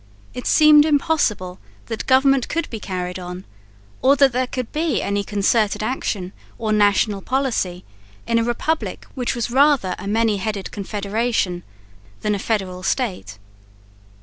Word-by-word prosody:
It 250 - -5
seemed 305 -1 +7
impossible 285 - 0 0.3
that 225 -2 -5
government 265 0 +4
could 335 - -1
be 225 - -5
carried 180 -2 -4
on, 180 +1 -7 0.6
or 275 +2 +5
that 275 -1 +5
there 255 +1 0
could 255 -2 -5
be 310 -3 0
any 200 0 -1
concerted 210 +1 +1
action 205 -6 -3 0.2
or 220 -2 -1
national 205 -1 +2
policy 235 -9 -1 0.4
in 230 0 +2
a - - +1
republic 275 +7 -2
which 250 -2 -2
was 235 0 -2
rather 270 -8 +3
a - - -7
many 220 0 +1
headed 200 0 -4
confederation 205 -2 -2 0.6
than 210 - 0
a 200 - -2
federal 190 -4 -2
state. 185 - -2
220 Hz, 145 wpm, -21 LUFS, 195-260 Hz, 0.6 s, seemed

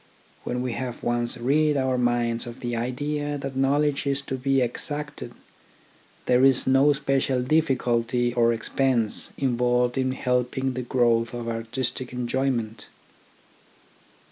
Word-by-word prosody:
When 125 +1 -2
we 125 - -2
have 125 0 -5
once 120 +1 -1
rid 145 +4 +2
our 130 -1 +1
minds 120 -1 0
of 120 +1 -9
the 120 -1 -2
idea 145 +5 -2
that 135 -1 -6
knowledge 140 +2 +1
is 140 0 0
to 135 - -4
be 135 +1 +1
exacted, 145 +4 -2 0.9
there 125 +1 +3
is 135 -2 +4
no 135 +2 +4
especial 135 -2 +1
difficulty 125 -5 +1
or 115 -1 +3
expense 115 0 0
involved 125 -1 +1
in 130 0 0
helping 125 +1 -1
the 130 - -3
growth 120 -1 +1
of 120 -1 -5
artistic 120 +2 -3
enjoyment. 120 -3 -2
125 Hz, 130 wpm, -25 LUFS, 120-135 Hz, 0.9 s, is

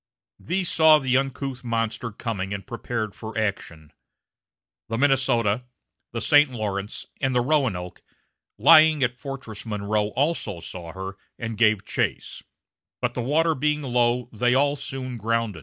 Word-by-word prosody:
These 180 +1 -1
saw 160 -1 +7
the 130 -3 0
uncouth 135 -1 -2
monster 115 0 -2
coming 100 -3 -4
and 100 - -8
prepared 115 -3 -4
for 110 0 -8
action. 85 -7 -3 1.0
The 115 - -1
Minnesota, 125 -4 +2 0.5
the 115 - -3
St. 145 +5 +5
Lawrence, 105 -4 -4 0.2
and 130 -2 +1
the 125 - +4
Roanoke, 120 -11 -1 0.6
lying 155 +4 +7
at 125 0 -1
Fortress 135 -5 -7
Monroe 105 -1 -1
also 135 - -1
saw 85 0 -8
her 95 +1 -6 0.2
and 115 -1 -4
gave 110 -2 +3
chase, - - -2 0.6
but, 125 -1 -1
the 125 - -3
water 160 +6 +2
being 150 +1 0
low, 120 -1 +1
they 125 +3 +2
all 140 +1 +3
soon 130 -3 -6
grounded. 115 -4 -1
120 Hz, 140 wpm, -24 LUFS, 105-135 Hz, 1.0 s, saw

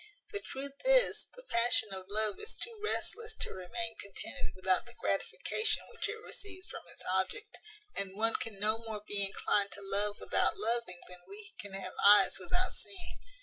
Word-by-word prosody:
The 410 - -1
truth 275 -6 -6
is, - - +4
the - - -11
passion 235 -2 +3
of 190 -1 -7
love 215 0 +3
is 430 - -6
too 470 -2 -4
restless 440 +1 +1
to - - -2
remain 225 +5 -4
contented 190 - -5
without 185 +3 +3
the 240 - -9
gratification 435 0 +1
which - - -1
it 420 - -2
receives 370 -2 -6
from - - -8
its - - -7
object; 190 - -1 0.4
and 195 -1 -2
one 225 +1 +3
can 215 -3 -3
no 215 +2 +3
more 220 -2 -6
be 200 -1 +1
inclined 200 +1 +1
to 200 - -7
love 205 +1 +2
without - - +3
loving 235 - -1
than 180 0 -8
we 425 +2 -7
can 200 -2 -6
have 190 -1 -5
eyes 205 +1 +8
without 365 +1 +1
seeing. 360 -3 -5
225 Hz, 180 wpm, -33 LUFS, -, 0.4 s, eyes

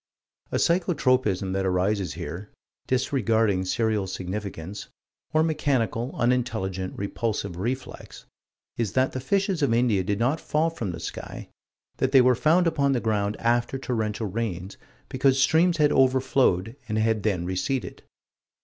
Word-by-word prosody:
A - - 0
psycho 175 0 +2
tropism 125 -9 +1
that 95 0 0
arises 95 +1 0
here 95 +5 -6 0.4
disregarding 115 -7 +1
serial 110 0 0
significance 95 0 -5 0.4
or 155 0 +3
mechanical, 135 -7 0
unintelligent, 110 -7 -1
repulsive 100 -2 -3
reflex 125 +7 -5 0.5
is 115 -4 -1
that 130 0 +2
the 130 - -4
fishes 195 +5 0
of 135 -5 +2
India 115 -6 +2
did 100 +2 -1
not 130 +8 0
fall 160 +2 0
from 115 - -4
the 85 - -7
sky; - - -7 0.5
that 130 +1 0
they 135 - +8
were 125 0 +5
found 155 +9 +3
upon 140 -4 +2
the 125 - +1
ground 105 -2 -1
after 120 +3 0
torrential 110 -4 -2
rains, 100 -3 -4 0.3
because 130 0 +2
streams 160 +5 +3
had 150 -2 +4
overflowed 130 -5 +2
and 110 - -1
had 110 0 +1
then 95 -5 -1
receded. 120 +9 -2
115 Hz, 140 wpm, -25 LUFS, 100-135 Hz, 0.5 s, they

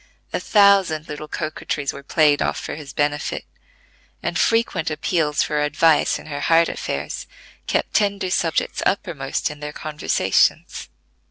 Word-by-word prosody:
A - - 0
thousand 195 -7 +4
little 150 +1 -7
coquetries 150 -2 -3
were 140 - -9
played 145 0 +3
off - - 0
for - - -5
his 150 -2 -8
benefit, 145 0 -1 0.8
and - - -2
frequent 225 -8 +1
appeals 155 -1 0
for 150 -1 -1
advice 150 +2 +3
in - - -12
her 145 -2 -5
heart 165 +3 +4
affairs 70 +1 -4 0.4
kept - - -1
tender 200 -3 +1
subjects 165 -3 0
uppermost 155 -9 -1
in 150 - -10
their 150 0 -6
conversations. 150 - 0
155 Hz, 140 wpm, -22 LUFS, 150-170 Hz, 0.8 s, thousand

